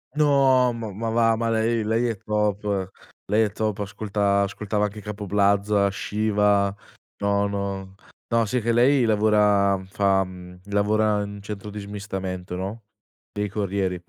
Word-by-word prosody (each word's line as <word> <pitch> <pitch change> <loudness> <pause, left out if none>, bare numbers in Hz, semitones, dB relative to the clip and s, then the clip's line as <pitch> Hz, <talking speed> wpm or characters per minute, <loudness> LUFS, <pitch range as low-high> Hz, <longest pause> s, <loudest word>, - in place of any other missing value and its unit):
No 135 -4 +4
ma 115 -2 -5
ma 115 +4 -3
va, 115 0 +3
ma 115 +1 -1
lei 115 0 +1
lei 115 +3 +1
è 115 -3 -2
top, 105 -2 -1 0.4
lei 105 +3 +3
è 105 - -1
top, 110 0 -2
ascolta 100 0 0
ascoltava 105 +1 -1
anche 105 +1 -6
Capo 105 0 -6
Plaza, 100 0 +2
Shiva, 105 -1 +1 0.5
no, 100 0 +1
no, 100 -1 -4 0.3
no, 115 -1 +2
si 115 +4 -1
è - - 0
che 115 +2 0
lei 125 +3 +4
lavora 105 -2 +3
fa, 95 -1 +2
mhmm, 90 -1 -11
lavora 105 +1 +2
in 100 0 -7
centro 105 0 -7
di 105 +1 -7
smistamento, 95 -3 -5
no, 100 +5 -5 0.5
dei 105 0 -2
corrieri 100 -2 -1
105 Hz, 155 wpm, -24 LUFS, 100-110 Hz, 0.5 s, No